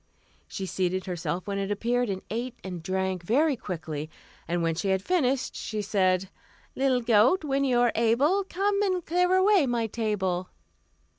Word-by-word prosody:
She 195 - -5
seated 185 0 -1
herself 175 -1 -3
when 200 -1 -3
it 195 0 -2
appeared, 240 +3 0
and 190 -1 -3
ate 240 +3 -3
and 180 -3 -6
drank 190 +1 -2
very 275 - +2
quickly, 160 -8 -5 0.4
and 170 0 -1
when 165 0 +1
she 175 +5 -3
had 190 0 +1
finished 275 -8 0
she 215 -2 -4
said: 190 -2 +1 0.5
"Little 260 -2 +2
goat, 235 - +4
when 275 -2 0
you 250 -3 +2
are 240 -1 +4
able, 265 - +2
Come 400 +2 0
and 370 -4 0
clear 360 +2 +2
away 375 -5 +4
my 240 -2 0
table." 195 -5 -2
220 Hz, 165 wpm, -27 LUFS, 185-275 Hz, 0.5 s, goat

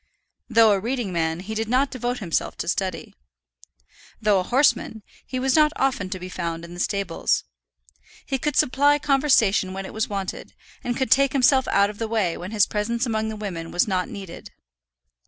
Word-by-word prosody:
Though 225 -2 +6
a 200 - +2
reading 230 -2 -3
man, 165 0 -1
he 210 +4 -6
did 220 0 -3
not 265 +3 +2
devote 245 0 -2
himself 180 -8 -2
to - - -4
study. 190 +1 -2 1.1
Though 210 -3 +3
a - - -1
horseman, 240 -2 +1 0.2
he 255 - -4
was 265 0 +1
not 305 -1 +5
often 260 -8 0
to 185 - -4
be 180 - -7
found 170 -2 -4
in 170 - -11
the 175 - -9
stables. 195 -3 0 0.8
He 270 - -2
could 295 +1 -2
supply 285 +3 +3
conversation 265 -10 +2
when 195 0 -5
it - - -9
was 220 0 -2
wanted, 195 -2 -5 0.3
and 245 -2 -2
could 260 -4 -1
take 275 +2 +4
himself 265 0 +4
out 200 +1 +3
of 205 - -16
the 225 - -2
way 215 -7 0
when 180 - -7
his 210 -2 +3
presence 230 +4 -1
among 220 -2 -1
the 220 - -5
women 180 -6 -5
was 175 - +1
not 185 -2 -1
needed. 190 -4 -9
215 Hz, 190 wpm, -23 LUFS, 185-255 Hz, 1.1 s, Though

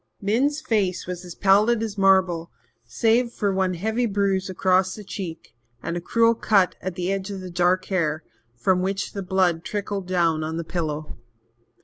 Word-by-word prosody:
Min's 260 +9 +1
face 200 - 0
was 180 0 -6
as 175 -2 -9
pallid 215 +4 +3
as 215 -3 -4
marble, 190 -4 +3 0.4
save 230 - +1
for 205 -4 -1
one 190 -1 0
heavy 220 +7 0
bruise 195 -2 0
across 185 0 +2
the 210 - -9
cheek 175 - -7 0.3
and 170 - -3
a 175 - -3
cruel 230 +5 +3
cut 200 -5 +2
at 185 -2 -4
the 180 0 -2
edge 195 0 -3
of 200 -1 -5
the 185 -1 -8
dark 180 +2 +2
hair, 160 -5 -1 0.3
from 180 +10 +1
which 195 +2 -2
the 200 - -4
blood 180 -3 +1
trickled 200 -2 -4
down 170 -4 +1
on 160 +1 -3
the 170 - -3
pillow. 155 -5 -4
190 Hz, 175 wpm, -24 LUFS, 175-205 Hz, 0.4 s, pallid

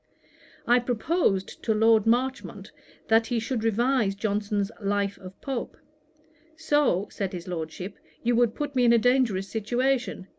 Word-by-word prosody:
I 245 +1 +4
proposed 245 - -1
to 220 - 0
Lord 220 0 +4
Marchmont 255 +3 -1 0.4
that 225 0 +3
he 240 -2 0
should 225 0 -3
revise 225 -1 +1
Johnson's 205 0 -1
Life 200 0 -1
of 185 0 -12
Pope: 270 -4 -4 0.8
'So 295 - +1
(said 195 -2 -4
his 180 0 -7
Lordship) 175 +2 -6 0.2
you 240 0 +2
would 235 -2 +2
put 290 -1 -4
me 250 - +3
in 235 -1 +5
a - - +6
dangerous 230 -5 +2
situation. 240 -1 -1
225 Hz, 145 wpm, -26 LUFS, 200-250 Hz, 0.8 s, a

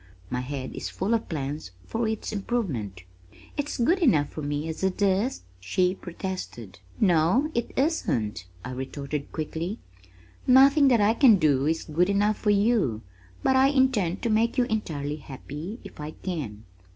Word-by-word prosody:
My 125 - -1
head 130 0 -5
is - - -4
full 195 +5 -1
of 230 - -1
plans 145 - -4 0.2
for 225 0 -1
its 220 0 -3
improvement." 150 - -3 0.5
"It's 290 0 -3
good 320 +10 +3
enough 155 - +3
for 155 - -7
me 145 +2 -2
as 160 - -5
it 190 +1 0
is," 200 - +1 0.2
she 180 - +1
protested. 175 - -7 0.2
"No, 185 - +3
it 235 - -1
isn't," 120 - 0 0.2
I 130 - -5
retorted 140 +2 -5
quickly. 165 +6 -4 0.7
"Nothing 275 +3 +7
that 240 -5 +4
I 205 +2 +4
can 240 -3 +7
do 145 -6 +2
is 160 +1 0
good 170 +4 +1
enough 205 +1 +2
for 210 - 0
you, 200 - +2 0.4
but 265 - +3
I 265 +1 +6
intend 260 -10 +2
to 235 - +1
make 230 +4 +2
you 250 - +5
entirely 155 - -2
happy 150 - -8
if - - -12
I 150 0 -5
can." 135 - -4
185 Hz, 165 wpm, -26 LUFS, 145-230 Hz, 0.7 s, Nothing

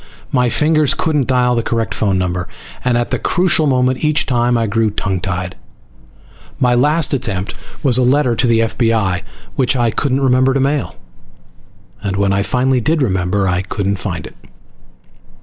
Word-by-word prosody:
My 125 -2 +2
fingers 155 +1 +2
couldn't 150 -5 0
dial 125 -1 +2
the 120 - +1
correct 115 -1 -2
phone 100 -3 0
number, 90 0 -2 0.4
and 125 -1 +2
at 120 - -2
the - - 0
crucial 170 -3 +1
moment 130 0 +1
each 150 0 +2
time 120 -1 +1
I 115 - +1
grew 110 +1 +1
tongue 95 -3 -3
tied. 90 -1 -3 1.0
My 125 -3 +3
last 150 +5 +2
attempt 95 -7 -2 0.3
was 130 -3 +3
a - - +3
letter 125 -1 +2
to 125 - +1
the 115 -1 +3
F.B.I., 110 -5 0 0.3
which 135 -1 +2
I 120 -2 +1
couldn't 135 +2 -1
remember 130 0 +3
to - - +2
mail, 140 +1 -1 1.1
and 100 -2 -2
when 100 0 +1
I 100 - +1
finally 125 +4 +1
did 155 +4 +1
remember 95 -2 0
I 90 0 0
couldn't 100 +1 -2
find 95 - -5
it. - - -12
120 Hz, 170 wpm, -16 LUFS, 100-135 Hz, 1.1 s, My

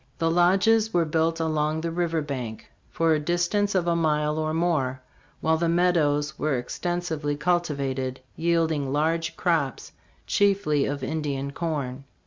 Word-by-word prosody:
The 165 -1 +1
lodges 195 +6 +3
were 170 -1 +3
built 165 +1 0
along 155 -1 0
the 165 0 -2
river 165 -2 -1
bank 125 -6 -6 0.2
for 165 -1 +2
a 155 - +2
distance 175 +6 0
STARVED 185 -3 +1
ROCK: 170 - +3
A - - 0
HISTORICAL 150 -2 +2
SKETCH. 150 0 0
of - - -4
a 155 - -1
mile - - 0
or - - -2
more, 150 -7 0 0.4
while 160 0 +2
the 170 +1 0
meadows 160 -4 +2
were 150 -3 +1
extensively 160 +2 -2
cultivated, 140 -6 -1 0.2
yielding 160 -4 +1
large 160 +3 0
crops, 160 -7 -1 0.3
chiefly 195 -8 +2
of 140 -1 -3
Indian 140 -2 -2
corn. 140 -5 -3
160 Hz, 165 wpm, -25 LUFS, 145-175 Hz, 0.4 s, lodges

